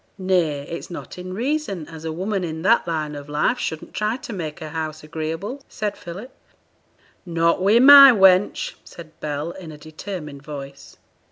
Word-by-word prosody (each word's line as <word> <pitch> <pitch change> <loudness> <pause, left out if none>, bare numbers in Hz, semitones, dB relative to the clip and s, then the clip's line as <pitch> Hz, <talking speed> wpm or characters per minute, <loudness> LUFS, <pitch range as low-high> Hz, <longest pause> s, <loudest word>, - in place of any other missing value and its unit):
'Nay, 180 -7 +1
it's 165 +4 -7
not 180 - -8
in 180 +1 -7
reason 225 - -2
as 160 -1 -10
a 160 - -3
woman 190 +4 -2
i' 160 -2 -4
that 230 -3 +4
line 155 -3 -2
o' 145 - -6
life 150 +12 0
shouldn't 160 -8 -5
try 215 +3 -1
to 240 - -8
make 160 -6 -5
her 155 - -7
house 155 -1 -5
agreeable,' 165 - -5
said 210 -2 -3
Philip. 195 +10 -9 0.9
'Not 170 0 +1
wi' 200 +4 +4
my 275 +2 +10
wench,' 190 -3 +3
said 165 -2 -12
Bell, 150 +2 -3
in 175 -3 -10
a 150 - -11
determined 155 -1 -8
voice. 140 -2 -10
170 Hz, 170 wpm, -22 LUFS, 155-200 Hz, 0.9 s, my